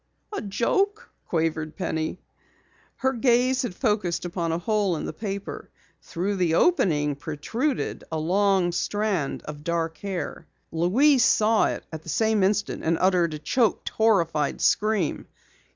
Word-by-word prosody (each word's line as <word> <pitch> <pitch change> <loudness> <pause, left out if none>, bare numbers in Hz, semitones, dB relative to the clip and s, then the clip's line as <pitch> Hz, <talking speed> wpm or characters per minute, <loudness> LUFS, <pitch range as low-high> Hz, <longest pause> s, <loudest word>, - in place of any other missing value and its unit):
"A - - -2
joke?" 395 - 0 0.2
quavered 160 -2 -1
Penny. 160 -2 -2 0.8
Her 265 0 0
gaze 250 +1 +2
had 240 -8 -4
focused 210 -8 0
upon 170 -1 -2
a 165 - 0
hole 200 0 0
in - - -4
the - - -5
paper. 200 -2 -6 0.3
Through 195 +4 -3
the 170 -3 +2
opening 150 - +2
protruded 220 - -3
a 160 - -1
long 185 +2 +2
strand 195 -3 -1
of 150 -1 -8
dark 165 -1 -2
hair. 195 -3 -5 0.2
Louise 240 - +4
saw 220 +1 +4
it - - -3
at 160 - -5
the 165 - -10
same 220 +2 +2
instant 205 +2 0
and 165 +1 +1
uttered 180 -4 +2
a - - -4
choked, 230 - 0
horrified 170 -10 +1
scream. 210 -6 +1
190 Hz, 140 wpm, -25 LUFS, 165-220 Hz, 0.8 s, Louise